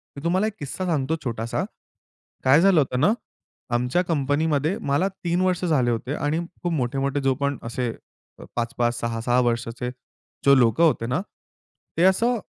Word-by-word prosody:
मी 140 - -9
तुम्हाला 185 +5 +2
एक 220 - -4
किस्सा 150 +6 -4
सांगतो 160 -2 0
छोटासा. 115 -1 -2 0.8
काय 135 +5 +6
झालं 190 -3 +5
होतं 130 -3 -1
ना, 160 +9 +5 0.6
आमच्या 125 +9 +1
कंपनीमध्ये 150 +2 +1
मला 165 +8 +2
3 180 -2 -2
वर्ष 185 -1 +1
झाले 135 -8 +2
होते 125 +5 -2
आणि 150 +2 -1 0.2
खूप 175 - -1
मोठे-मोठे 140 0 -1
जो 135 -1 +3
पण 140 -1 0
असे 120 0 -2 0.7
5-5, 120 0 0
6-6 115 +1 0
वर्षाचे 120 +1 -2 0.6
जे 140 0 +7
लोकं 120 +7 +4
होते 130 -7 +2
ना, 130 +8 0 0.8
ते 165 - +2
असं 230 +6 +3
140 Hz, 155 wpm, -24 LUFS, 125-170 Hz, 0.8 s, जे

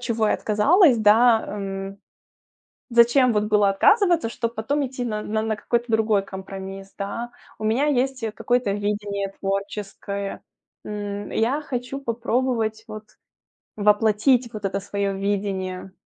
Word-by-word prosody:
чего 230 -3 0
я - - +2
отказалась, 275 - +4
да, 220 +2 +5
м, 195 -1 -5 0.9
зачем 240 +1 +5
вот 210 0 +1
было 210 -1 +3
отказываться, 350 - +3
чтобы 230 0 -3
потом 275 +6 -1
идти 255 -1 -5
на 215 -2 -3
на 220 +1 -1
какой-то 235 +3 -1
другой 220 -2 +2
компромисс, 195 0 -8
да. 230 +4 -4 0.3
У 215 - -8
меня 230 +7 +2
есть, 265 -1 0
э, 220 - -1
какое-то 245 +1 0
видение 205 -1 -2
творческое. 200 0 -4 0.4
М, 205 -1 -5
я 255 +7 0
хочу 255 0 -4
попробовать 235 -2 -1
вот 215 -1 -8 0.7
воплотить 220 +4 +3
вот 210 -2 -8
это 195 0 -1
свое 200 0 -2
видение. 195 -2 -3
215 Hz, 130 wpm, -23 LUFS, 200-240 Hz, 0.9 s, да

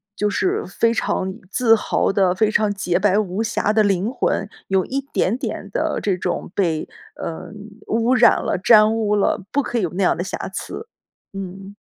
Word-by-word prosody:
就 210 - 0
是 190 -2 0
非 230 +4 +1
常 190 -4 -1 0.2
自 225 +2 +4
豪 220 - 0
的， 195 -2 +2
非 215 +3 +2
常 215 -1 +1
洁 190 -3 0
白 205 +1 +3
无 200 +1 -2
瑕 210 -1 0
的 215 0 +3
灵 200 +2 +1
魂， 210 -5 -1 0.2
有 190 -1 +2
一 270 - -2
点 215 +6 +1
点 - - -5
的 - - -1
这 195 -3 0
种 180 -1 -3
被， 165 -6 0 0.3
呃， 160 - -6 0.4
污 230 +3 +2
染 240 -1 +5
了、 - - 0
沾 215 0 +6
污 210 -2 +1
了， 200 -1 0
不 285 - +2
可 245 - -3
以 - - +1
有 170 - -1
那 195 +2 -1
样 - - +2
的 175 - -2
瑕 190 - -5
疵， 445 - -6 0.5
嗯。 195 +1 -8
205 Hz, 205 characters per minute, -21 LUFS, 190-225 Hz, 0.5 s, 沾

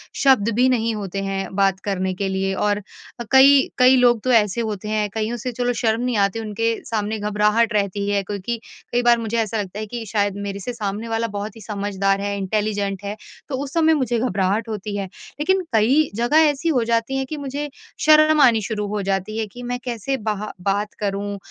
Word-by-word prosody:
शब्द 260 -7 +4
भी 250 +2 +4
नहीं 230 -2 +1
होते 195 -2 -4
हैं 195 0 -3
बात 195 -1 +2
करने 190 -2 -1
के 195 +2 -2
लिए। 190 0 -1
और 205 +1 0 0.5
कई 270 +1 +7
कई 255 0 +6
लोग 240 -2 +4
तो 255 - +1
ऐसे 220 -1 +3
होते 210 -2 -4
हैं 215 -1 0
कईयों 225 +2 -2
से 250 +2 -4
चलो 245 +1 -1
शर्म 225 -1 +1
नहीं 250 -3 0
आती 200 +2 +1
उनके 225 +1 -1
सामने 215 -1 -2
घबराहट 210 +2 +2
रहती 200 -1 0
है 200 -1 +1
क्योंकि 205 +4 -4 0.3
कई 245 - +2
बार 240 -1 +5
मुझे 230 0 -2
ऐसा 220 0 -2
लगता 195 +1 -7
है 215 - -3
कि 235 +1 -6
शायद 205 -2 +1
मेरे 200 0 -5
से 245 +6 -5
सामने 215 0 -4
वाला 225 0 -1
बहुत 205 +1 -4
ही 225 - -12
समझदार 200 -1 -1
है, 200 0 -2
इंटेलिजेंट 200 0 -2
है, 200 +1 -4 0.3
तो 275 - -2
उस 275 - -8
समय 320 -1 +4
मुझे 250 -6 0
घबराहट 205 -1 0
होती 210 -1 -4
है। 200 - -2 0.3
लेकिन 375 +5 +2
कई 260 +8 +3
जगह 295 +8 +4
ऐसी 290 +3 -1
हो 255 -7 +2
जाती 230 +3 0
है 265 - -1
कि 305 +3 -6
मुझे 285 +1 -4 0.4
शर्म 310 0 +6
आनी 235 -5 +5
शुरू 210 0 -3
हो 210 +1 -2
जाती 195 +2 -2
है 225 - -1
कि 245 +5 -11
मैं 245 0 -2
कैसे 245 +1 -2
बाहा 215 -1 -2
बात 200 +2 -1
करूँ 200 0 -2
215 Hz, 210 wpm, -21 LUFS, 200-245 Hz, 0.5 s, कई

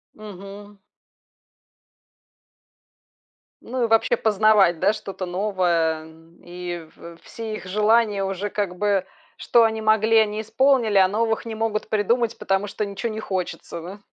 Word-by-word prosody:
Мгм. 205 0 -11 2.9
Ну, 250 0 -2
и - - -1
вообще, 225 0 +2
познавать, 210 -5 +3
да, - - +4
что-то 195 -3 -6
новое, 175 -4 0
эм, 165 +1 -18
и 175 -1 -7
в 170 0 -11
все 225 -1 -7
их - - -9
желания 210 +1 +2
уже, 195 +2 -3
как 195 -4 -3
бы, 200 -2 +1 0.3
что 235 -1 +3
они 220 0 0
могли, 220 +1 +3
они 215 0 +2
исполнили, 235 -2 +2
а 190 -1 +6
новых 225 +3 -1
не 225 -1 -5
могут 220 -1 -2
придумать, 230 +2 0
потому 195 +1 -1
что 210 +1 -3
ничего 200 +3 -4
не 220 - -5
хочется, 180 -3 -5
да? 190 +5 -9
205 Hz, 140 wpm, -23 LUFS, 185-220 Hz, 2.9 s, а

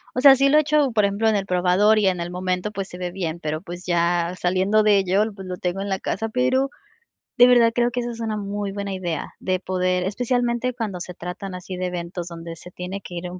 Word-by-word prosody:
o 250 - 0
sea, 275 0 +9
sí 275 +1 +3
lo 300 - +5
he - - +7
hecho, 300 -2 +2
por 215 -2 +2
ejemplo, 200 +3 0
en 220 - +2
el 195 -1 -1
probador 185 +4 +3
y 205 - +3
en 185 -2 +1
el 170 0 -3
momento, 185 +2 -2
pues, 195 -2 -4
se 180 - -10
ve 180 -1 -3
bien, 175 -3 -4
pero, 155 -1 -3
pues, 175 0 -8
ya 175 0 +1
saliendo 190 +4 +2
de 210 -1 +5
ello, 195 +2 +2
pues, 190 -2 -9
lo 180 0 -5
tengo 180 +2 -2
en 200 - -4
la 190 -1 -1
casa, 225 +3 -3
pero, 255 +3 +1 0.7
de 245 - +8
verdad 240 -2 +5
creo 240 +1 +1
que 245 - -2
esa 240 0 -4
es 230 - -9
una 220 -1 -2
muy 205 0 -3
buena 200 0 -4
idea, 175 -4 -4
de 185 -1 -1
poder 185 -1 0
especialmente 245 +4 0
cuando 215 -7 -4
se 180 - -6
tratan 180 +2 -7
así 180 +1 -7
de 185 - -2
eventos 175 0 -5
donde 165 -1 -8
se 180 - -12
tiene 180 +2 -6
que 175 - -9
ir 175 +1 -5
un 180 - -8
190 Hz, 255 wpm, -23 LUFS, 180-225 Hz, 0.7 s, sea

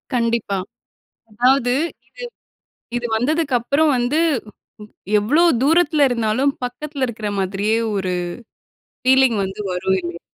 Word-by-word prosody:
கண்டிப்பா. 230 -4 0 0.7
அதாவது 245 +3 +2
இது 335 - -4 1.0
இது 240 0 -2
வந்ததுக்கப்புறம் 280 +2 +1
வந்து, 245 +6 0 0.6
வ் 210 - -9
வ் 210 - -17 0.3
எவ்வளோ 290 +12 +3 0.2
தூரத்துல 310 -1 +3
இருந்தாலும், 245 +3 +1
பக்கத்துல 270 +2 -3
இருக்கிற 215 -3 -5
மாதிரியே 195 +3 0 0.2
ஒரு 190 -2 -1 0.9
ஃபீலிங் 260 -2 +4
வந்து 190 +2 -6
வரும் 190 +1 0
இல்லையா? 170 0 -6
245 Hz, 110 wpm, -20 LUFS, 210-280 Hz, 1.0 s, ஃபீலிங்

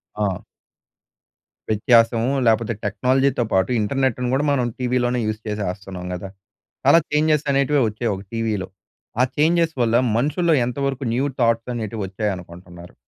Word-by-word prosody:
ఆ! 100 -4 -1 1.3
వ్యత్యాసము 115 +2 +3 0.2
లేకపోతే 115 0 +2
టెక్నాలజీతో 125 +5 +1
పాటు 95 +2 +2
ఇంటర్నెట్‌ని 125 +2 0
కూడా 140 +3 +1
మనం 125 -3 +1
టీవీలోనే 125 0 0
యూజ్ 110 0 -3
చేసేస్తున్నాం 95 -3 -5
కదా! 95 +2 -6 0.6
చాలా 155 +5 +7
చేంజ్‌స్ 150 0 +2
అనేటివే 140 +1 +2
వచ్చాయి 110 +1 -2
ఒక 95 - -9
టీవీలో. 110 -4 -2 0.5
ఆ - - +6
చేంజ్‌స్ 165 +1 +2
వల్ల 115 0 +1 0.2
మనుషుల్లో 155 +5 +2
ఎంతవరకు 135 +1 -2
న్యూ 130 +3 +1
థాట్స్ 115 0 +1
అనేటివొచ్చాయనుకుంటున్నారు? 95 -5 -5
115 Hz, 120 wpm, -21 LUFS, 105-135 Hz, 1.3 s, చాలా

